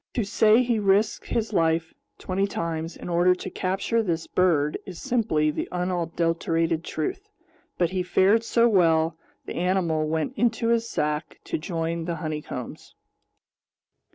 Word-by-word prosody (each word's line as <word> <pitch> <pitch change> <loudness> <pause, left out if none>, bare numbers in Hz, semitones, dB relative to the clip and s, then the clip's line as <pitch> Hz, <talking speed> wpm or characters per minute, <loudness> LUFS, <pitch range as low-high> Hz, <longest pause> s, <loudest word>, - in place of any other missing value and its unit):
To 235 - +1
say 220 +3 +4
he 235 -3 +1
risked 205 +1 +2
his 225 -1 -2
life 165 -2 +1 0.2
twenty 195 +2 -1
times 165 -3 -4
in - - -8
order 175 +1 +3
to - - -7
capture 195 +5 0
this 170 -6 -2
bird 160 -5 +1
is 180 -3 -9
simply 160 -11 +1
the - - -4
unadulterated 165 -2 0
truth; 380 - -4 0.5
but 175 -1 +1
he 185 -1 -1
fared 190 +5 +3
so 235 0 +3
well, 165 -6 +3 0.3
the - - -6
animal 170 -4 +1
went 160 0 -1
into 230 0 +1
his 230 0 +1
sack 150 +1 -2
to - - -3
join 165 0 -3
the 170 0 -2
honeycombs. 155 -5 -6
175 Hz, 145 wpm, -25 LUFS, 160-205 Hz, 0.5 s, say